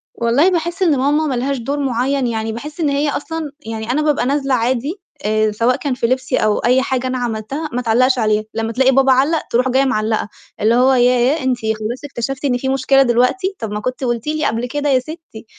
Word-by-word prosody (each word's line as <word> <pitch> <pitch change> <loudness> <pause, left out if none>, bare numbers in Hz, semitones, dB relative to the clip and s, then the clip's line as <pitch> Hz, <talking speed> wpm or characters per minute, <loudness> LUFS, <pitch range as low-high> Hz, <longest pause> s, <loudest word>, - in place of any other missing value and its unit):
والله 245 +10 +3
باحس 345 +1 -2
إن 305 -6 +3
ماما 295 +4 +1
ما 260 - -1
لهاش 270 +3 -1
دور 280 +5 -3
معيّن 265 0 0
يعني، 225 -1 -2
باحس 295 +8 -8
إن 300 -3 +1
هي 285 +1 0
أصلًا 315 +1 -4
يعني 220 +1 -4
أنا 300 +4 +1
بابقى 300 -5 +1
نازلة 275 0 0
عادي 255 - -1 0.2
آآ 215 0 +1
سواء 235 +4 +1
كان 280 -3 -2
في 235 -2 -1
لِبسي 260 +1 0
أو 215 -1 +2
أي 255 +2 +3
حاجة 260 -1 -1
أنا 255 0 -2
عملتها، 245 +6 -4
ما 250 - -1
تعلّقش 255 +3 +2
عليها، 215 -1 +1
لمّا 225 0 -2
تلاقي 265 +3 +3
بابا، 270 0 +4
علّق 280 +5 +2
تروح 250 +2 +1
جاية 265 +2 +2
معلّقة، 220 -3 -1 0.3
اللي 225 +2 +3
هو 260 +2 +4
"ياه! 250 +4 +3
أنتِ 255 -2 +1
خلاص 220 +3 -3
اكتشفتِ 270 +1 -4
إن 250 -3 +1
في 265 +2 -3
مشكلة 270 0 +3
دلوقتي؟ 255 +11 +1
طَب 220 -2 -5
ما 210 - -3
كنتِ 255 +4 -4
قُلتِ 240 +1 -2
لي 310 0 -1
قبل 230 +2 -1
كده 290 +2 -2
يا 260 -2 +4
ستّي."، 310 -6 -10
255 Hz, 220 wpm, -18 LUFS, 235-280 Hz, 0.3 s, بابا